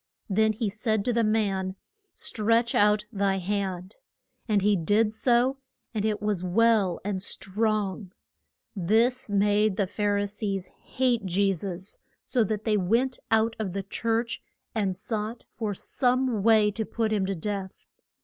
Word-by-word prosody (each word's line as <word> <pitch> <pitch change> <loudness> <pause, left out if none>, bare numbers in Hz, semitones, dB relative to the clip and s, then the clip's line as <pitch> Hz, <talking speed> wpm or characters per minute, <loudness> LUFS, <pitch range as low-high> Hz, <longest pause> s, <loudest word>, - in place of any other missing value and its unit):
Then 220 +2 +3
he 215 +1 -2
said 215 0 -1
to 245 - +1
the 230 0 +2
man, 195 -4 0 0.4
Stretch 230 -4 +1
out 210 0 +3
thy 200 -2 +1
hand. 190 0 -3 0.5
And 210 -3 +2
he 205 0 +4
did 210 +5 +2
so, 245 +3 +2 0.3
and 215 -2 -1
it 215 -1 -1
was 205 -4 0
well 200 -1 +3
and 200 -2 -2
strong. 200 -1 -2 0.6
This 225 +7 +2
made 205 0 +2
the 200 - +2
Phar 205 +2 0
i 205 - +1
sees 200 -2 -4
hate 245 -5 -1
Je 195 +2 +2
sus, 185 +1 -6 0.3
so 245 -3 +2
that 210 +1 -2
they 215 -2 +2
went 230 +7 +1
out 225 +1 +2
of 195 -5 -3
the 195 0 -3
church 230 +3 -1 0.3
and 195 -5 -1
sought 220 +2 -4
for 215 -4 -3
some 250 0 +1
way 215 -1 +5
to 220 +2 -3
put 220 0 -1
him 195 -3 +1
to 195 - -1
death. 195 +2 -5
210 Hz, 155 wpm, -27 LUFS, 195-225 Hz, 0.6 s, way